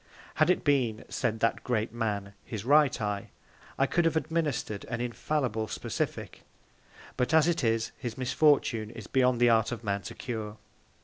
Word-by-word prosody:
Had -, -, +5 dB
it 180 Hz, -, +2 dB
been, 125 Hz, -7 st, +1 dB
said 110 Hz, -2 st, -1 dB
that 115 Hz, -, +1 dB
Great 115 Hz, -3 st, -1 dB
Man, 105 Hz, -4 st, -2 dB
his 110 Hz, -2 st, -6 dB
right 145 Hz, -1 st, +4 dB
Eye, 105 Hz, -2 st, -3 dB, 0.5 s
I 135 Hz, -, +3 dB
could 175 Hz, +5 st, +1 dB
have 165 Hz, -, +2 dB
administred 155 Hz, -10 st, -2 dB
an 115 Hz, 0 st, -4 dB
infallible 120 Hz, -2 st, -1 dB
Specific; -, -, -4 dB, 0.8 s
but 125 Hz, +5 st, +1 dB
as 160 Hz, 0 st, +5 dB
it 170 Hz, -4 st, +1 dB
is, 115 Hz, -1 st, +1 dB
his 120 Hz, -3 st, -5 dB
Misfortune 130 Hz, -4 st, +2 dB
is 115 Hz, -, -9 dB
beyond 125 Hz, -2 st, +2 dB
the 120 Hz, 0 st, +5 dB
Art 110 Hz, 0 st, +3 dB
of 120 Hz, -1 st, -5 dB
Man 100 Hz, -2 st, -1 dB
to 90 Hz, -, -8 dB
cure. 110 Hz, -3 st, -5 dB
120 Hz, 170 wpm, -29 LUFS, 110-140 Hz, 0.8 s, Had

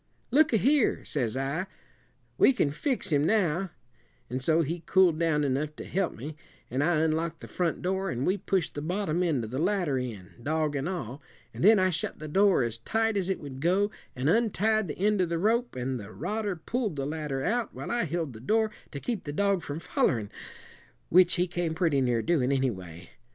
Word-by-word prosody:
'Look 300 Hz, +4 st, +5 dB
a 225 Hz, -, +4 dB
here,' 275 Hz, +3 st, +2 dB
says 125 Hz, -4 st, -1 dB
I, 140 Hz, +8 st, -2 dB, 0.7 s
'we 270 Hz, -, +6 dB
can 150 Hz, -, +1 dB
fix 195 Hz, -, -1 dB
him 145 Hz, -1 st, +3 dB
now;' 185 Hz, -1 st, +1 dB, 0.6 s
and 130 Hz, +1 st, -2 dB
so 160 Hz, +4 st, +3 dB
he 165 Hz, +3 st, -3 dB
cooled 180 Hz, -4 st, +4 dB
down 160 Hz, -3 st, +2 dB
enough 145 Hz, +2 st, -1 dB
to -, -, -7 dB
help 190 Hz, -1 st, -1 dB
me, 145 Hz, +6 st, -7 dB, 0.4 s
and 130 Hz, +3 st, +1 dB
I 160 Hz, -1 st, +2 dB
unlocked 160 Hz, +1 st, 0 dB
the -, -, -8 dB
front 175 Hz, -2 st, -2 dB
door, 190 Hz, +1 st, -1 dB
and 125 Hz, -2 st, -2 dB
we 185 Hz, -, +2 dB
pushed 185 Hz, -3 st, -1 dB
the 145 Hz, -, -4 dB
bottom 180 Hz, +1 st, -1 dB
end 155 Hz, -9 st, +1 dB
of 110 Hz, -, -6 dB
the 130 Hz, +4 st, -2 dB
ladder 175 Hz, -7 st, +1 dB
in, 105 Hz, -7 st, -6 dB
dog 155 Hz, +2 st, 0 dB
and 140 Hz, +4 st, -1 dB
all; 145 Hz, -, -5 dB, 0.3 s
an' -, -, -7 dB
then 215 Hz, +4 st, +7 dB
I 185 Hz, -1 st, +3 dB
shut 165 Hz, -, -3 dB
the 155 Hz, -, -7 dB
door 190 Hz, -2 st, +4 dB
as 115 Hz, -1 st, -3 dB
tight 225 Hz, -, 0 dB
as 195 Hz, -2 st, 0 dB
it 190 Hz, -, -1 dB
would 135 Hz, -3 st, -8 dB
go 190 Hz, +6 st, +2 dB, 0.2 s
an' 130 Hz, +2 st, -1 dB
untied 215 Hz, +1 st, +2 dB
the 150 Hz, -, -5 dB
end 205 Hz, +1 st, +2 dB
of 175 Hz, -, 0 dB
the 170 Hz, -, 0 dB
rope, 230 Hz, +7 st, +1 dB
an' 130 Hz, +1 st, -2 dB
the 105 Hz, -2 st, -9 dB
rodder 205 Hz, -, -3 dB
pulled 210 Hz, +3 st, -2 dB
the 135 Hz, -1 st, -2 dB
ladder 150 Hz, -3 st, -3 dB
out 235 Hz, -, -1 dB
while -, -, -5 dB
I 240 Hz, -5 st, +1 dB
held 165 Hz, -4 st, -3 dB
the 110 Hz, -, -10 dB
door 220 Hz, -, +1 dB, 0.2 s
to 140 Hz, -, -4 dB
keep 230 Hz, -, -3 dB
the 145 Hz, -, -3 dB
dog 200 Hz, +3 st, +1 dB
from 145 Hz, 0 st, -5 dB
follerin', 115 Hz, -9 st, 0 dB, 0.8 s
which 180 Hz, +1 st, +6 dB
he 180 Hz, 0 st, +2 dB
came 175 Hz, -2 st, -2 dB
pretty 160 Hz, -6 st, +2 dB
near 120 Hz, -3 st, +1 dB
doin', 145 Hz, -6 st, +2 dB
anyway. 95 Hz, -11 st, -3 dB
165 Hz, 210 wpm, -28 LUFS, 140-195 Hz, 0.8 s, then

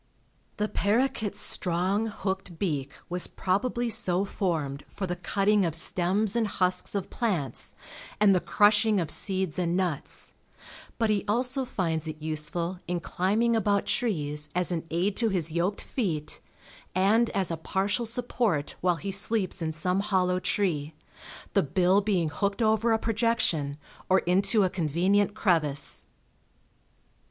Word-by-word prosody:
The 210 Hz, -, 0 dB
paroquet's 215 Hz, 0 st, 0 dB
strong, 185 Hz, +5 st, +1 dB
hooked 190 Hz, -4 st, -4 dB
beak 145 Hz, -8 st, -2 dB
was 180 Hz, 0 st, +2 dB
probably 235 Hz, +6 st, -1 dB
so 195 Hz, -4 st, +3 dB
formed 160 Hz, -9 st, -2 dB
for 195 Hz, -, -5 dB
the 180 Hz, -1 st, -3 dB
cutting 200 Hz, +3 st, +1 dB
of 165 Hz, -3 st, 0 dB
stems 190 Hz, +6 st, +1 dB
and 230 Hz, -2 st, +1 dB
husks 185 Hz, 0 st, +1 dB
of 200 Hz, -1 st, -3 dB
plants 185 Hz, -, -2 dB, 0.4 s
and 205 Hz, -2 st, +5 dB
the 185 Hz, -, +3 dB
crushing 205 Hz, +4 st, +3 dB
of 160 Hz, -3 st, +1 dB
seeds 190 Hz, -4 st, -1 dB
and 175 Hz, 0 st, 0 dB
nuts, 175 Hz, -6 st, -2 dB, 0.6 s
but 225 Hz, -2 st, +1 dB
he 205 Hz, -2 st, 0 dB
also 250 Hz, +5 st, +2 dB
finds 165 Hz, -8 st, -2 dB
it 155 Hz, 0 st, -6 dB
useful 160 Hz, +3 st, -3 dB
in 175 Hz, 0 st, -1 dB
climbing 210 Hz, +7 st, 0 dB
about 205 Hz, -2 st, +1 dB
trees 150 Hz, -9 st, -2 dB
as 180 Hz, 0 st, 0 dB
an 165 Hz, -1 st, -3 dB
aid 185 Hz, +5 st, 0 dB
to 230 Hz, -2 st, +2 dB
his 170 Hz, -5 st, 0 dB
yoked 175 Hz, +5 st, -1 dB
feet, 160 Hz, -, -2 dB, 0.5 s
and 215 Hz, +5 st, +3 dB
as 190 Hz, -3 st, 0 dB
a -, -, -1 dB
partial 200 Hz, +8 st, -1 dB
support 230 Hz, -, 0 dB
while 180 Hz, -1 st, +2 dB
he 195 Hz, +5 st, -5 dB
sleeps 200 Hz, -1 st, +2 dB
in 160 Hz, -1 st, -1 dB
some 180 Hz, +4 st, -1 dB
hollow 185 Hz, -3 st, +1 dB
tree, 160 Hz, -7 st, -1 dB, 0.6 s
the -, -, +4 dB
bill 180 Hz, +6 st, +2 dB
being 190 Hz, -6 st, 0 dB
hooked 200 Hz, +8 st, -1 dB
over 220 Hz, +1 st, +2 dB
a 225 Hz, -, +4 dB
projection 215 Hz, -11 st, 0 dB, 0.3 s
or 190 Hz, -, +5 dB
into 195 Hz, +4 st, +3 dB
a 185 Hz, -, +2 dB
convenient 190 Hz, +5 st, +1 dB
crevice. 155 Hz, -8 st, +1 dB
190 Hz, 145 wpm, -27 LUFS, 170-210 Hz, 0.6 s, and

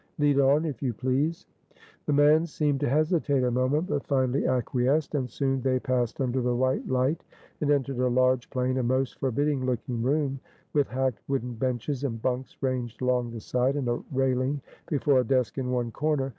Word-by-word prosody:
Lead 145 Hz, -2 st, +3 dB
on, 140 Hz, +4 st, +4 dB
if 145 Hz, -8 st, -4 dB
you 125 Hz, -5 st, -1 dB
please." 135 Hz, +7 st, -1 dB, 0.6 s
The 150 Hz, -, +2 dB
man 150 Hz, +3 st, +5 dB
seemed 150 Hz, -3 st, 0 dB
to 145 Hz, -, 0 dB
hesitate 150 Hz, -2 st, +2 dB
a 125 Hz, -, +1 dB
moment, 130 Hz, +6 st, +1 dB
but 145 Hz, -6 st, -3 dB
finally 130 Hz, -1 st, +1 dB
acquiesced; 130 Hz, +4 st, +1 dB
and 130 Hz, -4 st, -1 dB
soon 135 Hz, +2 st, -1 dB
they 130 Hz, 0 st, +1 dB
passed 125 Hz, -3 st, -1 dB
under 130 Hz, -1 st, 0 dB
the 125 Hz, 0 st, 0 dB
white 130 Hz, +2 st, 0 dB
light, 130 Hz, +5 st, +1 dB, 0.4 s
and 150 Hz, -, 0 dB
entered 140 Hz, -3 st, +1 dB
a 125 Hz, -, +2 dB
large, 130 Hz, 0 st, +2 dB
plain, 130 Hz, -1 st, -1 dB
and 125 Hz, -2 st, 0 dB
most 130 Hz, +1 st, 0 dB
forbidding 140 Hz, +1 st, 0 dB
looking 125 Hz, -1 st, -2 dB
room, 135 Hz, +1 st, 0 dB, 0.3 s
with 145 Hz, -2 st, +2 dB
hacked 130 Hz, -2 st, -1 dB
wooden 125 Hz, -3 st, -2 dB
benches 125 Hz, +3 st, -2 dB
and 115 Hz, -5 st, -2 dB
bunks 130 Hz, +2 st, -3 dB
ranged 125 Hz, -3 st, -2 dB
along 125 Hz, -1 st, +1 dB
the 115 Hz, -1 st, -7 dB
sides, 125 Hz, +5 st, 0 dB
and 135 Hz, -4 st, -2 dB
a 120 Hz, -, -1 dB
railing 130 Hz, +1 st, +1 dB, 0.3 s
before 145 Hz, -3 st, +3 dB
a -, -, +3 dB
desk 125 Hz, -1 st, 0 dB
in 125 Hz, -1 st, -2 dB
one 120 Hz, -2 st, -1 dB
corner. 145 Hz, 0 st, 0 dB
130 Hz, 190 wpm, -27 LUFS, 125-145 Hz, 0.6 s, man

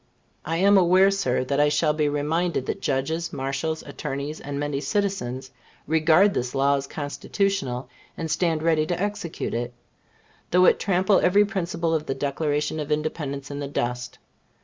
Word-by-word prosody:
I 165 Hz, +1 st, -1 dB
am 200 Hz, +2 st, +5 dB
aware, 185 Hz, +2 st, +5 dB
Sir, 130 Hz, -11 st, 0 dB
that 140 Hz, +2 st, -1 dB
I 150 Hz, 0 st, +5 dB
shall 150 Hz, +1 st, +2 dB
be 150 Hz, -1 st, +1 dB
reminded 150 Hz, +1 st, 0 dB
that -, -, -4 dB
judges, 160 Hz, +5 st, -1 dB
marshals, 135 Hz, +4 st, -3 dB
attorneys, 140 Hz, +1 st, -5 dB
and 140 Hz, 0 st, -5 dB
many 145 Hz, -1 st, -2 dB
citizens, 140 Hz, -7 st, -2 dB, 0.3 s
regard 160 Hz, +6 st, +4 dB
this 125 Hz, +2 st, -2 dB
law 140 Hz, +1 st, +3 dB
as 135 Hz, 0 st, -3 dB
Constitutional, 145 Hz, -3 st, -2 dB, 0.3 s
and 160 Hz, -1 st, -3 dB
stand 160 Hz, -1 st, +1 dB
ready 160 Hz, -2 st, +2 dB
to 175 Hz, 0 st, -2 dB
execute 205 Hz, -4 st, -3 dB
it, 120 Hz, +1 st, -3 dB, 0.7 s
though 180 Hz, +1 st, +5 dB
it -, -, +5 dB
trample 190 Hz, +1 st, +3 dB
every 200 Hz, +3 st, +4 dB
principle 170 Hz, -5 st, -2 dB
of 155 Hz, -1 st, -1 dB
the 135 Hz, -, -1 dB
Declaration 145 Hz, +2 st, -1 dB
of 150 Hz, 0 st, -4 dB
Independence 145 Hz, -2 st, -2 dB
in 140 Hz, -, -5 dB
the 140 Hz, -, -3 dB
dust. 125 Hz, -2 st, -3 dB
155 Hz, 165 wpm, -24 LUFS, 140-175 Hz, 0.7 s, am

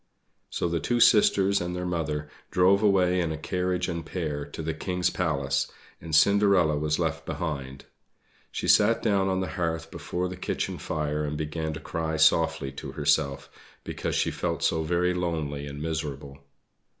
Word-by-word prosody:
So -, -, -1 dB
the 85 Hz, 0 st, -1 dB
two 120 Hz, +7 st, 0 dB
sisters 100 Hz, -3 st, +5 dB
and 90 Hz, 0 st, -3 dB
their 90 Hz, 0 st, -3 dB
mother 75 Hz, -4 st, -2 dB, 0.2 s
drove 95 Hz, +2 st, +4 dB
away 95 Hz, -3 st, +3 dB
in 85 Hz, -2 st, -1 dB
a 80 Hz, -, -3 dB
carriage 90 Hz, +2 st, -1 dB
and 85 Hz, -2 st, -3 dB
pair 75 Hz, -4 st, -3 dB
to 75 Hz, +2 st, -7 dB
the 80 Hz, +1 st, -2 dB
King's 90 Hz, +2 st, -1 dB
palace, 70 Hz, -6 st, -1 dB, 0.3 s
and 80 Hz, -1 st, -2 dB
Cinderella 100 Hz, -3 st, +4 dB
was 75 Hz, +1 st, 0 dB
left -, -, -1 dB
behind. 70 Hz, -5 st, -5 dB, 0.7 s
She -, -, -3 dB
sat 110 Hz, +2 st, +4 dB
down 100 Hz, -3 st, +2 dB
on 95 Hz, 0 st, 0 dB
the 95 Hz, -, -3 dB
hearth 80 Hz, -1 st, -2 dB
before 90 Hz, +1 st, -3 dB
the 90 Hz, -, -6 dB
kitchen -, -, -3 dB
fire 75 Hz, -1 st, -2 dB
and 75 Hz, 0 st, -3 dB
began 80 Hz, +1 st, -3 dB
to 80 Hz, -, -6 dB
cry 80 Hz, 0 st, -3 dB
softly 80 Hz, -2 st, +3 dB
to -, -, -7 dB
herself, 70 Hz, -1 st, +1 dB, 0.4 s
because -, -, -3 dB
she -, -, +1 dB
felt -, -, -2 dB
so 80 Hz, -, +2 dB
very 90 Hz, +3 st, +1 dB
lonely 80 Hz, -5 st, -2 dB
and 70 Hz, 0 st, -7 dB
miserable. 75 Hz, -3 st, -4 dB
80 Hz, 170 wpm, -27 LUFS, 75-90 Hz, 0.7 s, sisters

